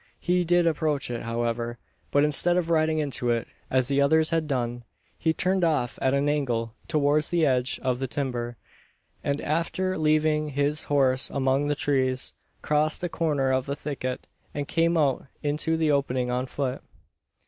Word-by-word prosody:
He 180 0 +1
did 175 0 +3
approach 150 -5 0
it, 120 - -3
however; 115 0 -2 0.3
but 145 - +3
instead 160 +4 +4
of 170 -2 0
riding 160 -1 +2
into 140 -5 -1
it, 115 -1 0 0.2
as 130 -1 +2
the 140 0 +2
others 160 +3 +3
had 165 -2 0
done, 120 -3 -2 0.3
he 160 - +1
turned 185 +3 0
off 150 -7 0
at 130 +1 +2
an 140 +1 +1
angle 120 -6 -1
towards 150 0 +2
the 170 -2 +2
edge 130 -2 +1
of 125 -2 0
the 135 - -2
timber; 120 -3 -3 0.7
and, 140 0 -1
after 170 +4 -1
leaving 155 0 +2
his 145 +2 0
horse 135 -2 +2
among 135 +1 +1
the 145 - +1
trees, 130 -3 0 0.3
crossed 155 +3 +1
a 175 - -1
corner 145 -6 0
of 130 0 0
the 140 - -2
thicket, 135 -4 -4 0.3
and 145 -1 -3
came 165 +1 +2
out 140 -4 +1 0.2
into 150 +2 0
the 160 -2 +2
opening 130 -3 0
on 125 +1 -1
foot. 130 -1 -3
145 Hz, 170 wpm, -26 LUFS, 130-155 Hz, 0.7 s, instead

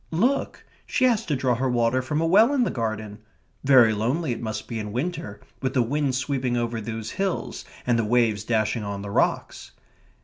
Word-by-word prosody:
"Look 240 +12 0 0.2
she 260 - +2
has 230 -3 +3
to 150 - +1
draw 130 -1 +1
her 130 +2 0
water 120 +1 +2
from 150 +4 -2
a - - +1
well 215 +11 +5
in 260 - +3
the - - 0
garden." 110 -2 -4 0.4
"Very 130 -5 +6
lonely 125 +8 -1
it 120 - -4
must 110 -2 -4
be 115 -2 -4
in 105 -1 -5
winter, 165 - -4 0.2
with 130 0 -2
the 125 - +4
wind 140 +2 0
sweeping 130 -1 -1
over 120 -1 -2
those 110 0 -5
hills, 195 -2 -2 0.2
and 120 -2 +2
the - - +2
waves 110 -2 +2
dashing 110 0 0
on 100 -1 -5
the 100 - -6
rocks." - - -1
125 Hz, 200 wpm, -25 LUFS, 110-150 Hz, 0.4 s, Very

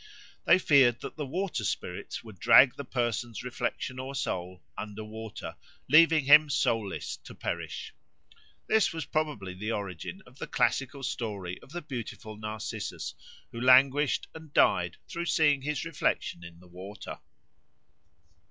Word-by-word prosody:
They - - +7
feared 135 -9 +4
that - - -7
the 150 -3 -4
water 180 - -2
spirits 95 -1 -4
would 110 -6 -12
drag 130 +7 +7
the 140 - -6
person's 120 -3 -2
reflection 125 +1 -3
or 135 +2 -5
soul 90 -7 -3
under 105 +1 -6
water, 110 0 -8 0.3
leaving 155 0 +6
him 150 +2 +8
soulless 115 -7 -1
to - - -13
perish. - - -5 0.7
This 220 -1 +3
was 160 -3 -4
probably 145 -14 -2
the 105 +5 -4
origin 100 - -5
of 125 +2 -18
the - - -5
classical 135 +1 0
story 100 -8 -4
of - - -16
the 175 0 -5
beautiful 115 -5 -7
Narcissus, 110 0 -5 0.4
who 115 - -6
languished 135 +3 +5
and 160 -2 -11
died 90 -1 +3
through 170 +1 -4
seeing 150 -5 +3
his 150 0 -2
reflection 85 - -1
in 85 0 -11
the 90 - -16
water. 95 +4 -9
120 Hz, 145 wpm, -29 LUFS, 105-145 Hz, 0.7 s, him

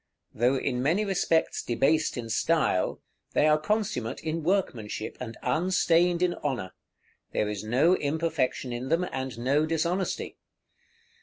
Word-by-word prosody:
Though 125 +4 +2
in 125 -2 -1
many 170 +11 +2
respects 175 -4 +1
debased 140 +7 +1
in 120 -2 -4
style, 155 - +1 0.3
they - - +3
are 155 0 +4
consummate 155 - -1
in 160 +1 -2
workmanship, 130 - -1
and 115 -3 -6
unstained 175 0 +2
in 180 -1 +2
honor; 125 -10 -2 0.6
there 105 - +1
is 105 -1 -4
no 130 +11 +3
imperfection 145 -5 -1
in 125 +2 -4
them, 170 +2 +2
and 130 -3 -4
no 140 +6 +1
dishonesty. 170 +4 -1
150 Hz, 135 wpm, -27 LUFS, 125-170 Hz, 0.6 s, are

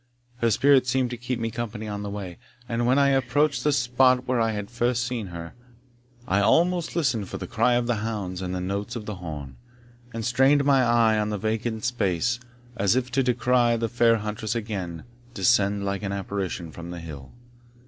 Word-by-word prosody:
Her 115 -2 +2
spirit 130 +3 +4
seemed 125 0 +1
to - - -3
keep 125 +1 -4
me 115 0 -2
company 115 -2 -5
on 105 -1 -4
the 105 - -4
way; 100 -4 -6 0.3
and 120 0 -1
when 130 +2 +4
I 140 -1 +4
approached 135 +3 +1
the 150 - +3
spot 125 0 +3
where 125 -2 +1
I 115 - +2
had 105 0 -5
first 120 0 0
seen 120 -5 -3
her, 85 -2 -8 0.7
I 95 - +2
almost 170 - +2
listened 130 - 0
for - - -5
the - - -6
cry 125 - +2
of 120 0 +1
the 120 -1 0
hounds 105 -4 -4
and 90 0 -3
the - - -2
notes 100 +4 -3
of 110 -3 -5
the 105 -2 -5
horn, 75 -7 -7 0.5
and 115 -2 -4
strained 135 +4 +4
my 140 -2 +5
eye 115 -3 +3
on 105 0 0
the 105 - -2
vacant 110 +2 -2
space, 115 0 0 0.4
as 100 0 +2
if 130 0 -1
to 135 +2 +2
descry 125 -1 +2
the 115 0 -1
fair 115 0 +3
huntress 105 +1 -3
again 95 -7 -4 0.3
descend 100 -1 +2
like 100 -1 -2
an 100 -1 -3
apparition 95 -4 -4
from 85 +2 -9
the 90 0 -6
hill. 75 -5 -9
115 Hz, 200 wpm, -25 LUFS, 100-125 Hz, 0.7 s, my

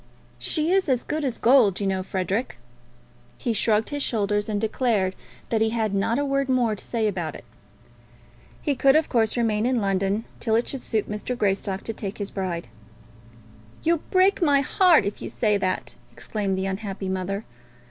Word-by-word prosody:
"She 315 +1 0
is 380 -4 +2
as 250 -2 +2
good 305 +1 -3
as 260 -4 -1
gold, 235 -6 +4
you 200 - -1
know, 190 -1 0
Frederic." 190 - -2 0.8
He 235 - -1
shrugged 220 +1 +1
his 290 0 -2
shoulders, 205 -3 0
and 205 -1 0
declared 215 -3 +1 0.4
that 225 -1 +1
he 220 - +3
had 220 -2 -1
not 200 +4 +1
a 285 - 0
word 275 -1 0
more 245 -4 +2
to - - -11
say 225 -2 -1
about 175 -6 -3
it. - - -11 1.2
He 290 - +1
could, 270 +1 +4
of 315 0 +3
course, 225 -1 +2
remain 220 -3 +1
in 255 -1 +1
London 195 +2 0
till 220 -2 +1
it 235 - +1
should 270 - -3
suit 220 -3 -1
Mr. 210 +4 -4
Greystock 195 -2 -1
to 225 - -4
take 200 -2 -6
his 205 -1 -5
bride. 180 -3 -3 1.2
"You'll 335 -1 +2
break 380 +2 +3
my 285 -4 +4
heart 335 - +4
if 200 - -4
you - - -5
say 210 -3 +1
that!" 185 -1 -2 0.2
exclaimed 200 -3 -2
the 190 0 -2
unhappy 195 0 -4
mother. 190 +2 -3
220 Hz, 185 wpm, -24 LUFS, 195-255 Hz, 1.2 s, gold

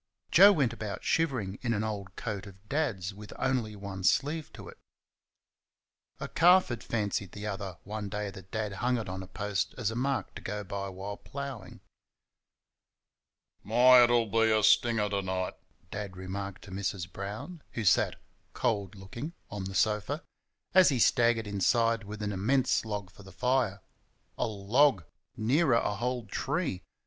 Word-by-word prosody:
Joe 195 +5 +9
went 140 - +2
about 110 -3 -5
shivering 125 -12 0
in 115 -2 0
an 105 - -1
old 100 -3 -5
coat 100 -3 -4
of 95 +1 -15
Dad's 110 - -1
with 105 +1 -11
only 125 -5 0
one 100 -1 -7
sleeve 150 - +1
to - - -10
it - - -12 1.4
a - - -4
calf 180 +1 +5
had 120 - -4
fancied 100 -4 -2
the 105 +1 -6
other 100 -3 -4
one 105 0 -5
day 105 -1 -3
that 95 -1 -12
Dad 110 -2 -3
hung 125 0 +2
it 110 -3 -4
on 95 +1 -5
a 95 - -8
post 100 +1 -2
as 115 -4 -1
a - - -5
mark 135 +3 -1
to - - -9
go 105 +1 -4
by 100 0 -4
while 95 +2 -6
ploughing. 135 -9 -7 1.8
"My! 125 +4 +7
it'll 120 -1 +4
be 115 +1 +2
a 110 -1 +3
stinger 110 0 +4
to 100 -1 -1
night," 95 -1 -2 0.4
Dad 100 -3 -5
remarked 95 +1 -5
to 100 - -11
Mrs. 95 -2 -3
Brown 110 - -6
who 110 - -3
sat, - - +4 0.4
cold 100 -2 -1
looking, 115 - -7 0.2
on 100 -2 -4
the 95 0 -6
sofa 110 - +1 0.5
as 185 -1 +7
he 135 - +1
staggered 115 -1 +3
inside 115 +3 +1
with 105 +1 -6
an 105 - -1
immense 120 +7 +1
log 100 -4 -4
for 95 - -15
the 95 -1 -13
fire. 115 -1 0 0.5
A - - 0
log! 110 - +3 0.3
Nearer 130 +4 +3
a 110 -3 +1
whole 120 +2 -2
tree! 140 - -2
105 Hz, 165 wpm, -30 LUFS, 100-120 Hz, 1.8 s, Joe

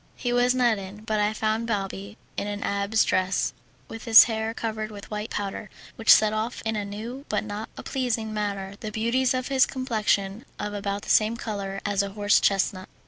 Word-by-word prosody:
He 245 -1 -2
was 245 +1 +3
not 240 -4 +3
in, 195 +2 -9
but 220 -1 -1
I 210 0 +2
found 220 +1 -1
Balbi 200 -1 -3 0.2
in 205 - -3
an 205 0 -4
abbé's 200 +2 +1
dress, 185 +1 +1 0.3
with 225 - -9
his 225 -2 +10
hair 220 -1 -2
covered 220 -1 -4
with 205 -1 -11
white 210 +1 -4
powder, 205 +1 -4 0.3
which 225 - +4
set 215 0 +6
off 220 +3 -3
in 225 0 0
a 210 - -1
new 220 +7 -7
but 210 - 0
not 215 +1 -6
a - - -7
pleasing 235 -5 -2
manner 200 -2 -3
the 215 - -5
beauties 240 +4 +1
of 255 +1 -2
his 265 -2 +4
complexion 215 -4 -1
of 210 0 -4
about 200 0 -3
the - - -9
same 220 +2 +3
colour 200 -3 -4
as 205 -1 +1
a 200 - -3
horse 205 0 +3
chestnut. 190 -1 0
215 Hz, 200 wpm, -25 LUFS, 200-225 Hz, 0.3 s, his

